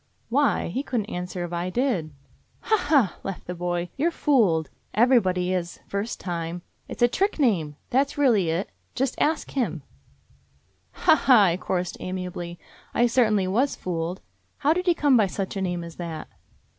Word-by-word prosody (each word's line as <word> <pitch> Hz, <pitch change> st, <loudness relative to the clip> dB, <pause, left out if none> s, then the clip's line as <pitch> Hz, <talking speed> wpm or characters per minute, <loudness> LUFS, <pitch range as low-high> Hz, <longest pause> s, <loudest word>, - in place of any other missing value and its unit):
"Why? 275 Hz, -4 st, +2 dB
He 250 Hz, +10 st, -2 dB
couldn't 235 Hz, -6 st, -3 dB
answer 180 Hz, 0 st, -4 dB
if 175 Hz, -, -8 dB
I 175 Hz, +1 st, -2 dB
did." 220 Hz, -, 0 dB, 0.5 s
"Ha, 440 Hz, -, +2 dB
ha!" 275 Hz, -, +3 dB
laughed 195 Hz, -2 st, -6 dB
the 180 Hz, -, -4 dB
boy. 175 Hz, 0 st, -2 dB
"You 300 Hz, +5 st, +2 dB
're -, -, +1 dB
fooled. 210 Hz, -, +2 dB, 0.2 s
Everybody 185 Hz, -7 st, +3 dB
is, 175 Hz, -1 st, -3 dB
first 200 Hz, +3 st, -3 dB
time. 170 Hz, -1 st, -4 dB, 0.2 s
It -, -, -7 dB
's -, -, +3 dB
a -, -, +8 dB
trick 395 Hz, +11 st, 0 dB
name. 180 Hz, -, +1 dB, 0.2 s
That 275 Hz, +3 st, +3 dB
's -, -, -11 dB
really 230 Hz, -, +3 dB
it 170 Hz, +4 st, -2 dB
— -, -, -42 dB
just 265 Hz, 0 st, 0 dB
'Ask 310 Hz, +1 st, +1 dB
Him'." 175 Hz, -, -2 dB, 1.2 s
"Ha, -, -, +8 dB
ha!" 255 Hz, -7 st, +6 dB
I 175 Hz, -3 st, +3 dB
chorused 180 Hz, -1 st, -2 dB
amiably. 180 Hz, -2 st, -5 dB, 0.4 s
"I 240 Hz, -, +4 dB
cer 240 Hz, +1 st, +4 dB
tainly 210 Hz, -3 st, +1 dB
was 245 Hz, +9 st, +1 dB
fooled. 175 Hz, +1 st, -3 dB, 0.4 s
How 295 Hz, +1 st, +3 dB
did 360 Hz, +2 st, -3 dB
he 350 Hz, -, +4 dB
come 290 Hz, -4 st, +4 dB
by 210 Hz, -3 st, +4 dB
such 190 Hz, +1 st, -4 dB
a 195 Hz, -, -2 dB
name 180 Hz, -2 st, -2 dB
as 170 Hz, -1 st, -10 dB
that?" 165 Hz, -3 st, -5 dB
195 Hz, 185 wpm, -25 LUFS, 175-260 Hz, 1.2 s, a